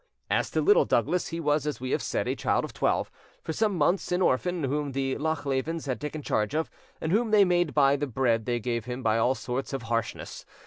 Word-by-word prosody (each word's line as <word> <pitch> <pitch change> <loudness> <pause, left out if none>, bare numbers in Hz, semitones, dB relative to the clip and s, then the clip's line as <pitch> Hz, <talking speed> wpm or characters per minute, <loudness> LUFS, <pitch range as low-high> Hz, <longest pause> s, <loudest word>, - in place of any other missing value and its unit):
As - - +1
to - - 0
Little 425 +4 +5
Douglas, 180 - +1
he 165 - -4
was, 150 -2 +1
as 150 - -2
we 130 +1 -4
have - - +1
said, - - -2
a - - 0
child - - 0
of - - -10
twelve, - - 0 0.3
for 160 - -3
some 210 0 +1
months 170 +4 +1
an 180 - +2
orphan, 175 +5 +1
whom 140 +1 -1
the 135 0 -1
Lochlevens 150 +1 -2
had 130 -3 -3
taken 150 0 -5
charge 105 +3 0
of, 160 +1 -1 0.3
and 160 - -2
whom 225 +4 +2
they 210 -2 +6
made 175 -3 +1
buy 140 -1 +5
the 145 +1 -2
bread 120 -3 0
they 120 -1 0
gave 115 -1 -2
him 125 +1 -5
by 110 0 +2
all 125 +3 +2
sorts 130 +2 -4
of 135 -3 -3
harshness. 115 0 -3
145 Hz, 230 wpm, -27 LUFS, 125-165 Hz, 0.3 s, they